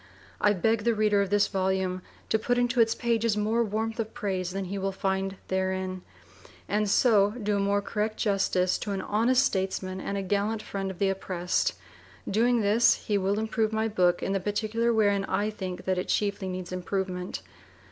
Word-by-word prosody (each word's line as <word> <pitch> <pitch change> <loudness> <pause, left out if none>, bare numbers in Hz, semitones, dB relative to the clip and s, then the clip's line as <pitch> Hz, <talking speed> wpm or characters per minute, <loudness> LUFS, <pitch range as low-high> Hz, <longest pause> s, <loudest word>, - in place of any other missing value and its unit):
I 205 - +4
beg 210 +3 +1
the 235 0 +2
reader 210 -1 +3
of 200 - -1
this 205 +1 +3
volume 190 -1 -1 0.3
to 220 - +2
put 245 +3 0
into 245 0 +1
its 225 0 +3
pages 230 -2 +1
more 220 +3 +1
warmth 220 +1 -2
of 220 -1 -3
praise 185 -3 -2
than 195 +1 -4
he 195 +2 -4
will 195 0 -1
find 195 0 -2
therein, 190 0 -2 0.7
and 210 +1 0
so 205 -2 +4
do 205 0 +1
a - - 0
more 200 0 +1
correct 215 +2 -2
justice 190 -3 +1
to 205 - -3
an 195 - -2
honest 240 +5 +3
statesman 190 0 -2
and 200 - -3
a 195 - -2
gallant 205 +3 -1
friend 195 -1 -4
of 190 - -7
the 195 +1 +2
oppressed. 185 -2 -1 0.5
Doing 235 +3 +2
this, 215 +3 +4
he 205 -2 +1
will 195 +2 0
improve 220 0 0
my 220 0 0
book 180 -5 +2
in - - -1
the 195 - +1
particular 215 +4 0
wherein 205 -3 +2
I 210 +2 0
think 185 -4 -6
that 185 -1 +1
it 180 - -4
chiefly 200 -2 -1
needs 185 -1 -5
improvement. 185 0 -3
200 Hz, 190 wpm, -27 LUFS, 190-220 Hz, 0.7 s, I